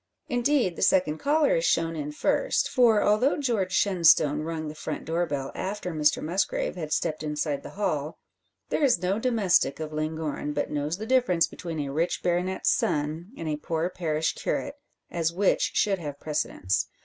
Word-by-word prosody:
Indeed 245 - +1
the - - -6
second 160 -5 +3
caller 310 - +3
is - - -1
shown 165 - +1
in 150 -1 -4
first; - - +1
for, 230 -5 +4
although 215 +9 +3
George 230 -10 0
Shenstone 170 -6 +4
rung 160 0 -4
the 150 - -5
front 155 - -5
door 170 +2 0
bell 140 -3 -3
after 190 -2 -4
Mr 150 -1 +2
Musgrave 185 +5 -1
had 155 -4 -5
stepped 155 0 -1
inside 150 -2 -2
the - - -9
hall, 155 -7 -2 0.5
there - - 0
is 255 -10 +4
no 190 +4 +1
domestic 215 - +2
of 155 -1 -5
Llangorren 155 -1 -3
but 145 - -2
knows 150 +3 -2
the 215 - -5
difference 240 -9 +3
between 165 -3 -6
a 140 -1 -4
rich 165 +4 -1
baronet's 180 +2 +1
son 155 +5 -1
and 165 - -5
a 150 -1 -1
poor 165 +3 -2
parish 160 -3 -1
curate; 285 +1 -3 0.3
as 165 -1 0
which 190 +3 +2
should 195 -3 +2
have 145 -4 -6
precedence. 125 -10 -1
165 Hz, 175 wpm, -26 LUFS, 150-205 Hz, 0.5 s, for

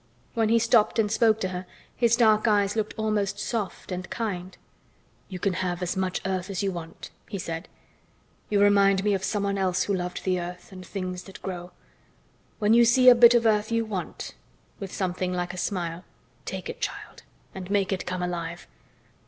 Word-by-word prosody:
When 225 -2 +1
he 230 - +5
stopped 225 -1 +3
and 210 -2 +2
spoke 220 -1 +3
to 185 - 0
her 180 0 -6 0.3
his 235 -1 +3
dark 220 -2 +4
eyes 205 -1 +2
looked 215 -1 -2
almost 215 -2 0
soft 210 -3 -4
and 180 0 -4
kind. 190 -5 -4 0.7
"You 185 - -5
can 190 +1 0
have 180 0 -2
as 180 +2 -2
much 190 -1 -1
earth 185 -1 -2
as 195 0 -2
you 195 - 0
want," 165 -2 -8 0.2
he 200 - -4
said. 165 -1 -5 0.8
"You 205 -1 +3
remind 200 -1 +4
me 205 -1 +2
of 190 -1 -1
someone 200 -1 -1
else 185 -1 +1
who 200 - -1
loved 180 -1 -3
the 185 -1 +1
earth 180 +2 -8
and 185 -1 -9
things 185 -1 -5
that 195 - -11
grow. 180 -2 -5 0.9
When 210 0 +3
you 235 +1 +7
see 250 +2 +7
a - - +10
bit 240 0 +7
of 235 -1 +3
earth 215 0 +2
you 230 0 +1
want," 200 -5 -5 0.5
with 195 -3 -6
something 185 -1 -2
like 180 0 -2
a - - -8
smile, 175 -2 -3 0.4
"take - - -5
it, - - -7
child, - - -5 0.3
and 185 -1 -7
make 200 -1 +1
it 190 - -2
come 180 0 -2
alive." 170 -1 -4
195 Hz, 195 wpm, -26 LUFS, 180-215 Hz, 0.9 s, a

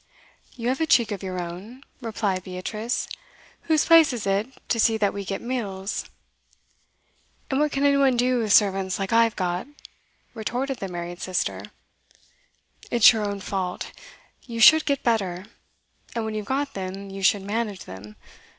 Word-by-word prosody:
'You 240 -1 -2
have 265 +4 -1
a 320 - +1
cheek 235 -6 +4
of 200 - -4
your 185 -2 -4
own,' 190 +10 -8 0.2
replied 205 -5 -2
Beatrice. 210 +6 -3 0.6
'Whose 310 -1 +4
place 330 -3 +7
is 240 -4 -4
it 200 +3 +1 0.2
to 230 - +1
see 225 0 +3
that 205 -2 +1
we 200 - -4
get 195 0 -4
meals?' 205 -5 -3 1.5
'And 265 - +1
what 300 0 +2
can 275 +1 0
any 280 0 +4
one 270 -3 +3
do 250 +1 +2
with 220 -3 -1
servants 195 -3 +3
like 195 +2 -3
I've 230 -1 +4
got?' 180 +3 -2 0.7
retorted 245 +4 -3
the 195 - -4
married 175 -1 -6
sister. 185 -1 -2 1.2
'It's 240 0 +7
your 220 -1 -2
own 200 -1 -3
fault. 185 -2 -3 0.6
You 230 -2 -5
should 315 +8 +8
get 280 -2 0
better; 195 -6 0 0.7
and 230 -1 -1
when 220 - -3
you've 210 -1 -4
got 275 +1 -1
them, 195 +1 -6
you 195 0 -7
should 195 +1 +3
manage 210 -1 -3
them. 100 +3 -10
210 Hz, 165 wpm, -24 LUFS, 190-245 Hz, 1.5 s, should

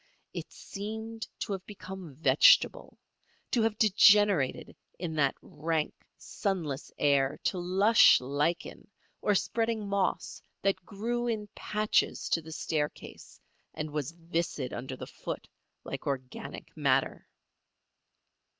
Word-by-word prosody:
It - - -6
seemed 220 +2 -6
to - - -3
have 190 -1 -5
become 190 -6 -9
vegetable; - - +4 0.5
to 240 - +2
have 220 -1 +1
degenerated 205 - +4 0.2
in 170 -2 -4
that 140 -2 +2
rank, 160 0 -2 0.2
sunless 165 -9 -3
air 140 0 +2
to 200 -6 0
lush 195 +6 +6
lichen 145 +10 -2 0.3
or 205 - +2
spreading 225 0 0
moss 200 -1 -1 0.2
that 190 -2 +1
grew 235 +6 -2
in 215 -3 -2
patches 215 0 0
to 165 - +2
the 160 0 -11
staircase 150 -1 -4 0.4
and 155 0 -4
was 150 0 -3
viscid 165 -5 -3
under 130 +2 -5
the - - -6
foot - - -7 0.4
like - - -6
organic 130 -2 -5
matter. - - +1
185 Hz, 115 wpm, -30 LUFS, 150-210 Hz, 0.5 s, lush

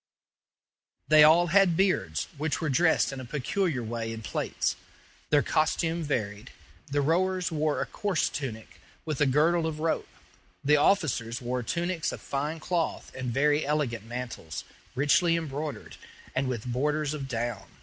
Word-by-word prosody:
They 155 0 +8
all 165 +3 +7
had 190 -4 +5
beards, 190 0 +1
which 150 +1 -1
were 160 - -1
dressed 160 +1 +3
in 135 - -6
a - - -6
peculiar 145 +2 -1
way 115 0 -3
in 115 0 -7
plaits. - - -1 0.5
Their 145 -1 +4
costume 165 +2 +1
varied. 110 -6 -3 0.4
The 145 0 0
rowers 180 +4 +1
wore 155 -1 0
a - - 0
coarse 200 -6 0
tunic, 115 -7 -6 0.2
with 155 -3 -3
a 150 - +5
girdle 160 +5 +3
of 155 -1 -4
rope. 160 +1 -1 0.5
The 150 +2 +5
officers 135 - +2
wore 125 0 -2
tunics 170 +4 -1
of - - -7
fine 150 +4 -3
cloth 170 0 -2
and 130 -2 -4
very 145 +4 +2
elegant 135 -7 -1
mantles, 120 -9 -6 0.3
richly 150 +5 +3
embroidered, 150 -2 -5 0.4
and 130 0 0
with 125 -3 -3
borders 145 +4 0
of 140 -3 -5
down. 120 -4 -3
150 Hz, 150 wpm, -28 LUFS, 125-160 Hz, 0.5 s, They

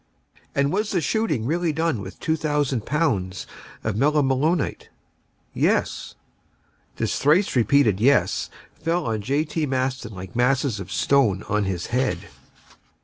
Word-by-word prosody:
"And 140 0 +2
was 210 +2 0
the 185 - +1
shooting 155 - 0
really 170 +4 0
done 160 -7 0
with 95 -1 -9
2,000 150 -6 0
pounds 105 - 0 0.4
of 110 - -1
melimelonite?" 145 +4 +1 0.6
"Yes." - - 0 0.8
This - - -1
thrice 155 +7 +3
repeated 120 -4 +3
"yes" 130 +4 +2 0.3
fell 165 0 0
on 110 -2 -1
J. 140 +8 0
T. 155 0 -2
Maston 130 -4 -2
like 90 -1 -9
masses 125 -2 +1
of 95 - -8
stone 115 -9 +2
on 105 -1 0
his 95 0 -3
head. 130 +1 +1
135 Hz, 130 wpm, -23 LUFS, 110-155 Hz, 0.8 s, thrice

